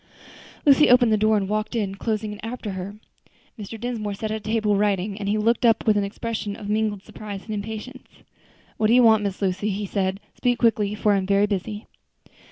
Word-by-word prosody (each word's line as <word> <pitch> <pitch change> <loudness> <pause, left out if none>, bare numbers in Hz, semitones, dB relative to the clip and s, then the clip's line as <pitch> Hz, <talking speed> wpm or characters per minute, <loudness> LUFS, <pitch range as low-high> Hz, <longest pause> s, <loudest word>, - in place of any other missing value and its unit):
Lucy 290 +1 +6
opened 245 -2 +6
the - - +5
door 215 +1 +3
and 195 -2 -1
walked 215 +3 -2
in, 205 -4 -1
closing 215 +1 -3
it 205 - -10
after 225 -2 -5
her. 190 +2 -6 0.6
Mr. 215 +2 -7
Dinsmore 220 -4 -3
sat 215 +2 -4
at 220 - -1
a - - -7
table 215 -1 0
writing, 200 -1 0
and 200 -1 -3
he 210 - +1
looked 230 +3 +1
up 225 -2 +3
with 215 - +4
an 205 - +2
expression 210 0 -4
of 205 - -8
mingled 210 -1 -1
surprise 205 -2 -8
and 215 - -5
impatience. 220 +5 -6 0.7
"What 215 - +2
do 225 - +4
you 250 - +6
want, 220 -2 +6
Miss 200 -1 -3
Lucy?" 195 +2 0
he 205 +1 -2
said, 190 -1 -1
"speak 245 -1 0
quickly, 215 -3 +2
for 210 -1 +2
I - - +3
am 190 -1 -2
very 200 +1 +4
busy." 210 +1 -4
210 Hz, 215 wpm, -23 LUFS, 200-220 Hz, 0.7 s, Lucy